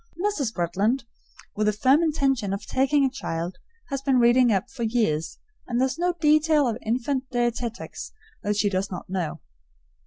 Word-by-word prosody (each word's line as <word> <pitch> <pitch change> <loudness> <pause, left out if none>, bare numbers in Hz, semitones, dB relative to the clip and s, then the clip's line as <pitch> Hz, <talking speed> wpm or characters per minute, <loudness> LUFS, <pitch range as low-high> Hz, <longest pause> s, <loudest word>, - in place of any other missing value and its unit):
Mrs. 360 - 0
Bretland, 200 +9 0 0.5
with 215 0 0
the 210 - +3
firm 260 +8 +4
intention 270 - +1
of 200 - -5
taking 275 +2 +2
a - - +2
child, 170 -8 -4 0.3
has 275 -2 -2
been 270 -1 +2
reading 240 0 +5
up 195 -3 +1
for 255 - -10
years, 220 -9 0 0.3
and 240 -1 -1
there 260 - +4
is 265 +4 -4
no 355 0 +1
detail 305 -2 +4
of 230 0 -2
infant 255 +3 -1
dietetics 240 -1 -3 0.3
that 210 0 -1
she 210 - +2
does 195 0 -1
not 180 0 -7
know. 180 -5 -3
240 Hz, 175 wpm, -25 LUFS, 205-275 Hz, 0.5 s, reading